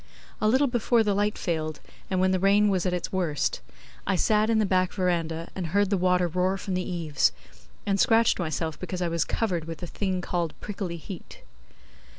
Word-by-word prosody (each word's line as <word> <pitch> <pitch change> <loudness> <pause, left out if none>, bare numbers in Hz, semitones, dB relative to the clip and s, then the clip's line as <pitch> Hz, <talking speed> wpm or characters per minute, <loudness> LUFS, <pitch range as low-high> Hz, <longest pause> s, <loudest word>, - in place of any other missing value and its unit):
A 215 - +3
little 260 +6 +4
before 240 -2 +2
the 205 -2 +1
light 205 +1 0
failed, 155 -3 -2 0.3
and 185 - 0
when 185 0 +3
the 185 - +1
rain 200 +2 +4
was 185 -2 +1
at - - +1
its 180 -1 -3
worst, 170 - -1 0.5
I 195 - +2
sat 215 +4 +2
in 225 - +3
the 215 - +3
back 185 -1 +1
verandah 165 -3 -1
and 185 -3 -3
heard 200 +4 +1
the - - +4
water 180 0 +2
roar 180 +3 0
from 190 0 -4
the 185 - 0
eaves, 165 -5 +1 0.5
and 195 -1 +1
scratched 230 -1 +4
myself 160 -2 -2
because 185 0 -3
I - - +1
was 165 0 +1
covered 180 -8 -1
with 165 -1 -6
the 160 - -6
thing 185 +1 -2
called 175 -2 -3
prickly 190 -4 -4
heat. 175 +2 -10
185 Hz, 200 wpm, -26 LUFS, 170-205 Hz, 0.5 s, little